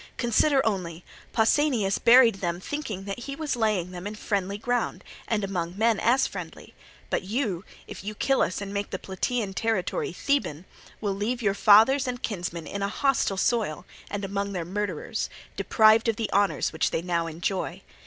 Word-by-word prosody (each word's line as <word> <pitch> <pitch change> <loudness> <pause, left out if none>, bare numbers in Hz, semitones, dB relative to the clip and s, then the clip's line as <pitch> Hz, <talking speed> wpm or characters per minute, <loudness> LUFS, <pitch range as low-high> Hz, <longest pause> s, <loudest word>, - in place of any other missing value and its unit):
Consider 270 +4 +3
only: 180 -5 -2 0.3
Pausanias 225 -3 +2
buried 235 -4 +6
them 175 -1 -1
thinking 215 -4 -5
that 200 +3 -5
he 275 +3 -6
was 305 -2 -2
laying 210 -6 0
them 180 +2 -6
in 210 - -6
friendly 200 -2 -2
ground 245 +3 -1 0.2
and 215 -3 0
among 180 -2 -3
men 225 0 +3
as 255 +3 +3
friendly; - - -8 0.4
but - - +1
you, 200 -2 -2 0.2
if - - -9
you 210 +1 -5
kill 270 +5 +2
us 185 +3 0
and 200 0 -5
make 200 0 -2
the 190 - -3
Plataean 195 +3 -2
territory 220 -3 -1
Theban, 180 - -1 0.4
will 205 -2 0
leave 230 +5 -2
your 200 -2 +2
fathers 225 +7 +6
and 245 0 -3
kinsmen 175 -7 -4
in 200 - -5
a 200 - +1
hostile 255 -5 +1
soil 190 -6 0 0.2
and 205 -1 -3
among 200 +1 -3
their 175 -3 -3
murderers, 195 -2 -3 0.3
deprived 220 +1 +4
of 225 - +2
the 225 -2 -3
honours 200 -3 +2
which 160 - +1
they 165 - -2
now 170 -2 0
enjoy. 170 +4 -3
205 Hz, 175 wpm, -26 LUFS, 185-235 Hz, 0.4 s, buried